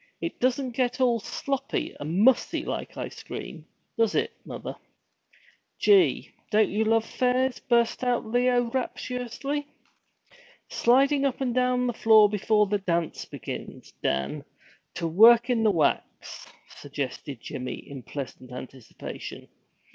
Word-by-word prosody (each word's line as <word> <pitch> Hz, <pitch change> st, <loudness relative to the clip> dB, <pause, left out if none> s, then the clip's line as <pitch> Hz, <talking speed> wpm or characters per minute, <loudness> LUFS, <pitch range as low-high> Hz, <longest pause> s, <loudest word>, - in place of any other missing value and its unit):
'It 335 Hz, -, -5 dB
doesn't 255 Hz, +1 st, 0 dB
get 250 Hz, 0 st, -1 dB
all 245 Hz, -3 st, +3 dB
sloppy 275 Hz, +5 st, -3 dB
and 160 Hz, +6 st, -1 dB
mussy 260 Hz, +1 st, +3 dB
like -, -, -5 dB
ice -, -, -6 dB
cream, -, -, -8 dB, 0.4 s
does 225 Hz, -2 st, +2 dB
it, -, -, +1 dB
mother?' -, -, -7 dB, 1.0 s
'Gee, 395 Hz, -3 st, +4 dB, 0.2 s
don't 215 Hz, -1 st, +3 dB
you 210 Hz, +3 st, +1 dB
love 225 Hz, 0 st, +2 dB
fairs!' 255 Hz, +1 st, 0 dB
burst 235 Hz, 0 st, +1 dB
out 245 Hz, -2 st, +1 dB
Leo 245 Hz, +2 st, +2 dB
rapturously. 260 Hz, +3 st, -3 dB, 1.0 s
'Sliding 275 Hz, +4 st, +3 dB
up 275 Hz, -1 st, 0 dB
and 255 Hz, -3 st, -1 dB
down 250 Hz, 0 st, +2 dB
the 245 Hz, -, 0 dB
floor 220 Hz, -1 st, +6 dB
before 210 Hz, +1 st, +2 dB
the 205 Hz, 0 st, -1 dB
dance 170 Hz, -4 st, -2 dB
begins, -, -, -8 dB
Dan, 70 Hz, 0 st, -1 dB, 0.5 s
to 165 Hz, -, -2 dB
work 230 Hz, +8 st, +6 dB
in 235 Hz, -2 st, +2 dB
the 220 Hz, -, +4 dB
wax?' 160 Hz, -7 st, -1 dB, 0.2 s
suggested 140 Hz, -2 st, -6 dB
Jimmy, 125 Hz, +2 st, -5 dB
in 140 Hz, -2 st, -8 dB
pleasant 130 Hz, 0 st, -8 dB
anticipation. 125 Hz, -1 st, -9 dB
235 Hz, 130 wpm, -26 LUFS, 190-250 Hz, 1.0 s, floor